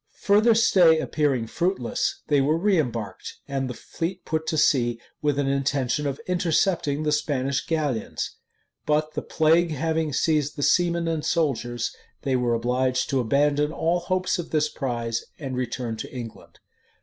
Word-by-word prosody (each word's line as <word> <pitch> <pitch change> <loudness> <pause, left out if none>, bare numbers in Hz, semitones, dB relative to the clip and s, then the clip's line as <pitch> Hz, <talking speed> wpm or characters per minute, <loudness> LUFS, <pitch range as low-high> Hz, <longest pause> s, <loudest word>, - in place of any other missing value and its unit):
Further 215 +3 +4
stay 180 -7 +5
appearing 145 -6 0
fruitless, 170 - -1
they 145 -2 +3
were 150 +4 +2
reëmbarked; 155 - -1
and 135 -2 -2
the 125 - -5
fleet 175 +9 -5
put 160 0 -2
to 160 - 0
sea 120 -6 +2 0.2
with 145 -2 +1
an 140 -1 +1
intention 140 +1 0
of 140 0 -3
intercepting 175 -4 +1
the 150 - +1
Spanish 140 -3 0
galleons. 150 -8 -2 0.5
But 155 +1 +1
the - - -2
plague 165 +2 +3
having 160 +1 -1
seized 150 0 +1
the 145 - -3
seamen 170 0 +2
and 160 -2 -1
soldiers, 120 -7 -1 0.3
they 135 -2 +1
were 120 -2 +1
obliged 125 +2 0
to 135 - +2
abandon 145 +5 +2
all 170 +2 0
hopes 185 +1 -1
of 170 - -5
this 150 -1 +1
prize, 120 -5 -3
and 135 -4 -5
return 120 -2 -3
to - - -7
England. 120 -3 -9
150 Hz, 155 wpm, -25 LUFS, 130-165 Hz, 0.5 s, stay